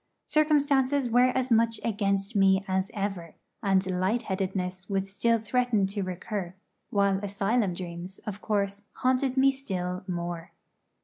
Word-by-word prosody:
Circumstances 285 Hz, -4 st, +2 dB
were 245 Hz, +2 st, +5 dB
as 255 Hz, 0 st, -1 dB
much 230 Hz, -1 st, +3 dB
against 200 Hz, -1 st, 0 dB
me 195 Hz, 0 st, +4 dB
as 190 Hz, 0 st, 0 dB
ever, 195 Hz, -5 st, -3 dB, 0.3 s
and 195 Hz, -3 st, +2 dB
light 215 Hz, +6 st, +1 dB
headedness 190 Hz, -1 st, -3 dB
would 195 Hz, -1 st, 0 dB
still 215 Hz, +4 st, +1 dB
threaten 225 Hz, -1 st, +1 dB
to 200 Hz, +1 st, -3 dB
recur, 185 Hz, 0 st, -4 dB, 0.3 s
while 200 Hz, -1 st, +2 dB
asylum 200 Hz, 0 st, 0 dB
dreams, 175 Hz, +1 st, -7 dB
of 205 Hz, -1 st, -5 dB
course, 200 Hz, -1 st, -1 dB
haunted 255 Hz, +1 st, +1 dB
me 270 Hz, +1 st, +6 dB
still 185 Hz, -9 st, -4 dB
more. 175 Hz, -1 st, -4 dB
200 Hz, 135 wpm, -28 LUFS, 190-235 Hz, 0.3 s, me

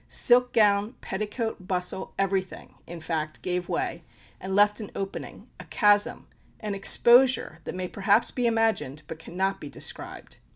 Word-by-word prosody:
Silk 250 Hz, 0 st, +3 dB
gown, 210 Hz, 0 st, +3 dB
petticoat, 210 Hz, -1 st, -5 dB
bustle 180 Hz, 0 st, -3 dB
everything, 195 Hz, -1 st, -2 dB
in 170 Hz, 0 st, -8 dB
fact, 155 Hz, -1 st, -4 dB
gave 180 Hz, -1 st, -2 dB
way, 170 Hz, 0 st, -3 dB, 0.4 s
and 190 Hz, +1 st, -4 dB
left 205 Hz, +1 st, +4 dB
an 210 Hz, -, -7 dB
opening 195 Hz, 0 st, -7 dB
a -, -, -9 dB
chasm 205 Hz, -1 st, +2 dB, 0.3 s
an 210 Hz, -2 st, -4 dB
exposure, 240 Hz, -2 st, +4 dB
that -, -, -6 dB
may 185 Hz, 0 st, -3 dB
perhaps 200 Hz, +4 st, +2 dB
be 245 Hz, -2 st, -1 dB
imagined, 220 Hz, -, 0 dB
but 160 Hz, +2 st, -9 dB
cannot 190 Hz, +4 st, -3 dB
be 145 Hz, -, -7 dB
described. -, -, -6 dB
195 Hz, 150 wpm, -26 LUFS, 180-215 Hz, 0.4 s, left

